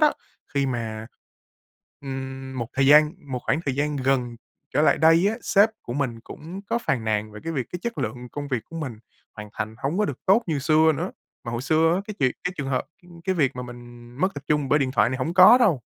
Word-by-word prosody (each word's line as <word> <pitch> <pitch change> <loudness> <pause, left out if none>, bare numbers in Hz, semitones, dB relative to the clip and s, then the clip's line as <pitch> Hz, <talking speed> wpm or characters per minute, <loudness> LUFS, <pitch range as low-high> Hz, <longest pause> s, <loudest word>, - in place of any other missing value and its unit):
đó, 300 -1 +5 0.4
khi 140 -1 +2
mà, 110 -3 -4 0.9
ừm, 135 -1 -6
một 120 -1 -3
thời 135 0 +2
gian 150 +2 +7 0.2
một 125 - -1
khoảng 150 - +1
thời 135 - 0
gian 150 +1 0
gần 130 -3 0 0.3
trở 150 - +2
lại - - +4
đây 165 +4 +5
á, 220 - -1
sếp 205 +2 +4
của 120 - -6
mình 125 -4 -2
cũng 165 +10 -9
có 230 +4 -1
phàn 125 - -1
nàn 110 -1 -1
về 105 - -9
cái 165 - -3
việc 130 -5 -2
cái 180 - -3
chất 235 -1 -4
lượng 125 -1 -4
công 145 -1 -5
việc 130 -4 -1
của 165 - -10
mình 135 -9 -5 0.4
hoàn 105 0 -8
thành 110 0 -4
hổng 150 +7 -2
có 210 - +3
được - - -4
tốt 200 +5 +5
như 155 -4 -1
xưa 155 +3 +4
nữa. 145 - -3 0.3
Mà 120 - -5
hồi 120 +2 -3
xưa 160 +3 +3
á, 185 - 0
cái 215 - -6
chuyện 130 -2 +2
cái 180 - -1
trường 135 -1 -3
hợp, 130 0 0 0.2
ưm, 170 -1 -15
cái 190 - 0
việc 135 -6 +1
mà 125 - -4
mình 120 -1 -11
mất 185 0 +1
tập 145 - -8
trung 150 -3 +1
bởi 150 - +4
điện 135 -3 0
thoại 115 - +3
này 130 - -2
hổng 165 +7 -2
có 195 +7 +9
đâu. 180 - +3
140 Hz, 250 wpm, -24 LUFS, 125-165 Hz, 0.9 s, có